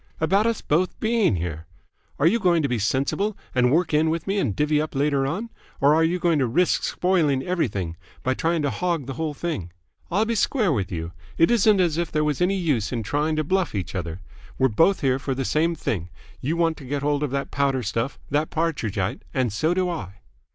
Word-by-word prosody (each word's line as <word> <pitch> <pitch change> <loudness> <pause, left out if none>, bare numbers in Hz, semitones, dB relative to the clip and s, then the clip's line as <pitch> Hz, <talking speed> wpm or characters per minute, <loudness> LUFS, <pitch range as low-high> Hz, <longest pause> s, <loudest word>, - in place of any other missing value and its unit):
"About 195 +7 +3
us 230 -1 -1
both 175 +5 0
being 220 - +2
here? 80 -2 -4 0.5
Are 145 - +1
you 225 +8 +4
going 175 -5 +3
to - - +2
be 120 -3 -1
sensible 140 - 0 0.2
and 125 -1 +3
work 165 +1 +2
in 155 +1 +3
with 165 0 -2
me 200 +1 0
and 115 - 0
divvy 150 0 +2
up 155 -2 -5
later 140 -1 +1
on, 210 +11 -4 0.3
or 140 +2 +5
are 160 +1 +4
you 170 +3 +1
going 170 -3 +2
to 130 - +2
risk 175 +10 +2
spoiling 160 -8 +1
everything 100 - -2 0.3
by 130 - +1
trying 165 +3 0
to 145 - +1
hog 170 -6 -1
the 135 - -5
whole 155 0 -3
thing? 145 - -4 0.4
I'll 200 +5 +2
be 230 - -1
square 215 - +2
with 100 -7 -2
you. 85 -1 -4 0.3
It 165 - +4
isn't 215 -3 +4
as 170 -3 +2
if 170 -2 -2
there 150 0 +1
was 150 +1 -1
any 190 +2 +2
use 140 - 0
in 115 -3 -2
trying 150 +9 0
to 155 - 0
bluff 185 - 0
each 95 -3 -3
other. 85 -1 -4 0.4
We're 130 0 +3
both 165 - +3
here 130 -2 +2
for 135 -1 -2
the 135 0 -2
same 165 +5 +1
thing. 90 - -3 0.3
You 155 +9 -2
want 165 -1 +1
to 140 - -10
get 140 +2 -3
hold 145 0 +1
of 150 - 0
that 140 +1 -3
powder 135 -2 +1
stuff, 115 +6 -2
that 150 +2 +1
Partridgite, 115 - -1
and 125 -5 +1
so 160 +10 +1
do 185 -1 +1
I." 105 - -5
150 Hz, 225 wpm, -24 LUFS, 130-175 Hz, 0.5 s, or